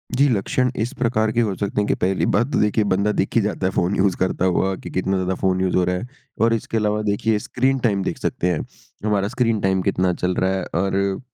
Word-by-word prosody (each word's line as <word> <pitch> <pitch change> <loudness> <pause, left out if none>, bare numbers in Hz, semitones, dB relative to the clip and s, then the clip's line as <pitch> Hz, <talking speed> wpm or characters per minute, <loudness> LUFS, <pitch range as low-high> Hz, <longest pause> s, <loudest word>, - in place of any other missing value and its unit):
जी। 140 +3 +4
लक्षण 125 +3 +1
इस 120 - -1
प्रकार 110 -3 +1
के 120 - +1
हो 105 -4 0
सकते 100 0 -1
हैं 105 - -1
कि - - +2
पहली 95 +1 +1
बात 120 +6 +1
तो - - +1
देखिए 105 +1 +2
बंदा 100 +3 +2
देखे 105 +3 +1
जाता 100 -2 -2
है 95 - +1
फ़ोन 90 +3 0
यूज़ 95 -1 +2
करता 95 0 0
हुआ 95 +1 +1
कि - - -9
कितना 95 +1 -1
ज़्यादा 95 0 -1
फ़ोन 95 -1 +1
यूज़ 95 - 0
हो 90 - +3
रहा 90 +1 0
है 115 +7 -5 0.3
और 115 +1 +4
इसके 115 0 -2
अलावा 105 0 0
देखिए 105 +1 +1
स्क्रीन 130 +5 0
टाइम 100 -6 +1
देख - - -3
सकते 90 - -1
हैं। 80 - -2 0.4
हमारा 100 -2 +1
स्क्रीन 115 -2 0
टाइम 95 -1 +1
कितना 90 0 +1
चल 90 +1 -1
रहा 95 0 +1
है 95 - -2 0.2
और 95 0 0
100 Hz, 245 wpm, -21 LUFS, 95-110 Hz, 0.4 s, जी